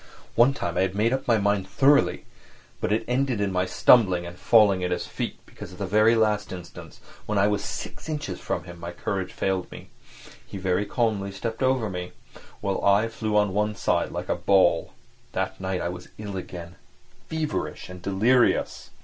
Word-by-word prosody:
One 125 +4 +4
time 85 - -3
I - - +3
had 95 0 0
made 110 +4 +2
up 135 - -2
my 115 -2 +4
mind 100 -2 +1
thoroughly, 140 +5 +3 0.5
but - - -1
it 110 +1 +1
ended 125 -2 0
in 100 -1 0
my 90 0 0
stumbling 95 -8 +4
and 85 0 -8
falling 100 -1 +4
at 90 - 0
his 90 - -2
feet - - -4
because 90 - -11
at - - -12
the 100 - -3
very 110 +4 +4
last 105 -2 +1
instant 85 -2 -9 0.3
when 105 - 0
I 100 - +4
was 105 -1 0
six - - -6
inches 145 - -4
from - - -3
him 90 -1 -11
my 85 +1 -6
courage 95 +1 -3
failed 95 -2 -2
me. - - -11 0.5
He - - -9
very 95 +2 0
calmly 105 -3 0
stepped 110 +5 -5
over 130 -3 +2
me, 90 -2 -5 0.5
while 100 -1 -2
I 100 +3 +4
flew 110 -2 -1
on 105 -2 +2
one 105 +1 0
side - - 0
like - - -5
a - - +1
ball. 95 -4 +2 0.4
That - - -3
night 95 -1 -2
I - - -1
was 90 0 -8
ill 105 -2 -6
again, 90 -1 -7 0.5
feverish 160 -1 -3
and 90 0 -10
delirious. 110 +7 +2
100 Hz, 190 wpm, -25 LUFS, 90-110 Hz, 0.5 s, One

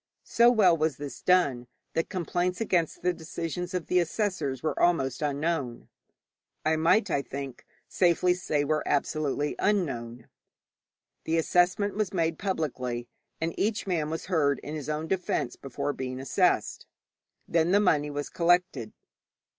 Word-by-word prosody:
So 235 +1 +5
well 205 -8 +5
was 155 -4 0
this 145 -1 -7
done, 140 -10 +2 0.3
that 165 - -1
complaints 180 0 -1
against 175 -9 0
the 180 0 +2
decisions 170 +2 -5
of 180 - -2
the 180 - +2
assessors 165 - -1
were 155 - -1
almost 135 -7 +2
unknown 145 -4 -2 0.8
I 160 0 +3
might, 170 +5 +3
I 140 - +2
think, 135 -2 -7 0.2
safely 180 0 +3
say 155 -5 -1
were 155 +1 0
absolutely 145 0 0
unknown. 125 - -1 1.0
The 165 +1 +1
assessment 180 +5 +2
was 210 -2 -2
made 165 -2 0
publicly, 125 -10 -3 0.3
and 165 +1 -1
each 215 +1 0
man 165 -6 -1
was 160 +1 -4
heard 150 -6 +2
in 150 - -6
his 155 -1 -5
own 155 +1 -2
defence 175 -9 -1
before 140 +2 -4
being 130 -1 -5
assessed. 135 -1 +1 0.6
Then 165 0 +2
the 200 +3 +5
money 150 -7 +2
was 145 0 -4
collected. 170 -9 +1
160 Hz, 145 wpm, -28 LUFS, 140-180 Hz, 1.0 s, So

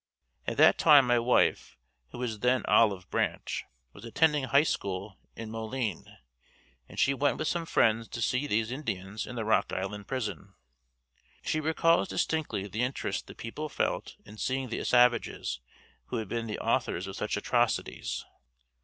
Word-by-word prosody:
At - - -2
that - - +6
time 145 -4 +7
my 120 -1 +3
wife 120 +2 +2 0.3
who - - -10
was 120 -4 -3
then 125 0 +2
Olive 100 -3 +3
Branch, - - -1 0.3
was - - -13
attending 150 +4 +2
High 140 +2 +4
School 95 -7 -3 0.2
in 110 -1 -7
Moline, 115 -3 -4 0.7
and - - -13
she 140 - +4
went 140 +1 +1
with 155 - -2
some 170 -1 -1
friends 115 -3 +2
to - - -7
see 125 +5 0
these 110 -1 0
Indians 105 -7 -4
in 125 - -7
the 115 -2 -3
Rock 110 - +2
Island 100 +2 -4
prison. 105 -6 -4 0.9
She 155 - 0
recalls 165 +3 +2
distinctly 155 - -1
the 110 +4 -3
interest 125 +2 -2
the - - -11
people 150 +7 -6
felt - - -2
in 105 +1 -12
seeing 130 +2 -2
the 115 - -3
savages 120 - +2 0.5
who - - -4
had 110 - -3
been 115 -1 -3
the 105 - -3
authors 90 - 0
of 95 0 -7
such - - -2
atrocities. - - -1
115 Hz, 160 wpm, -29 LUFS, 105-135 Hz, 0.9 s, time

